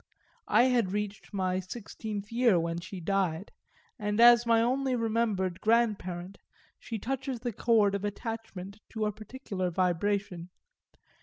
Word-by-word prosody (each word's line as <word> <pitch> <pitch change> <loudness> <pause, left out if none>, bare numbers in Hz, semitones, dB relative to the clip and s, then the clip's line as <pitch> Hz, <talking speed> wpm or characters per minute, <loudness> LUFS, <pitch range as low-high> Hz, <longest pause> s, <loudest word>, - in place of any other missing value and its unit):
I 235 - +5
had 240 -7 +2
reached 210 0 -4
my 185 -2 0
sixteenth 205 +1 -6
year 230 -6 +4
when 165 0 -2
she 185 +2 -8
died, 190 0 -1 0.5
and 210 0 -1
as 240 0 +7
my 230 -1 +5
only 260 +3 +1
remembered 220 -6 0
grandparent 200 -5 0 0.4
she 230 - -5
touches 260 +2 -3
the 240 -2 -3
chord 215 -2 +3
of 200 0 -2
attachment 205 -2 -5
to 220 -1 -1
a 210 - 0
particular 210 -4 -5
vibration. 180 0 -1
210 Hz, 135 wpm, -29 LUFS, 185-230 Hz, 0.5 s, as